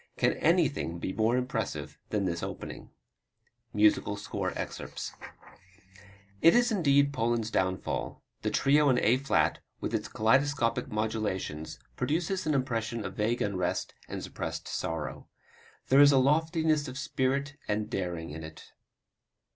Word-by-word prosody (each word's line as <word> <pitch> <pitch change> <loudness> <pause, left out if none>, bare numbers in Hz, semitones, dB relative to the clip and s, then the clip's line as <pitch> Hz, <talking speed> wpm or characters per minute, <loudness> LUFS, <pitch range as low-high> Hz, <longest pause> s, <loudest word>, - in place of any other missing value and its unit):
Can - - +3
anything 85 +1 +2
be 95 +2 -3
more 115 +3 +2
impressive 125 0 -3
than 105 -2 0
this 85 -2 -2
opening? - - -6 0.8
[Musical 105 -1 +3
score 105 - -3
excerpt] - - -5 1.3
It 165 - +7
is 240 0 +4
indeed 140 -7 +3
Poland's 115 -3 0
downfall. 95 -2 -2 0.2
The - - 0
Trio 145 +1 +4
in 125 - +4
A 120 +2 +4
flat, 135 +1 +1 0.2
with - - -4
its - - -1
kaleidoscopic 120 +1 +2
modulations, 105 -8 -3 0.2
produces 170 +7 -1
an 155 - +2
impression 115 -4 -1
of 95 - -4
vague 110 +5 0
unrest 90 -3 -1 0.2
and - - -5
suppressed - - -5
sorrow. 80 0 -4 0.6
There 135 +2 +7
is 145 0 +8
loftiness 155 +2 +2
of 130 +1 -7
spirit 140 0 -1
and 105 0 -1
daring 85 -4 -3
in 80 +1 -7
it. 80 0 -11
120 Hz, 130 wpm, -29 LUFS, 105-140 Hz, 1.3 s, is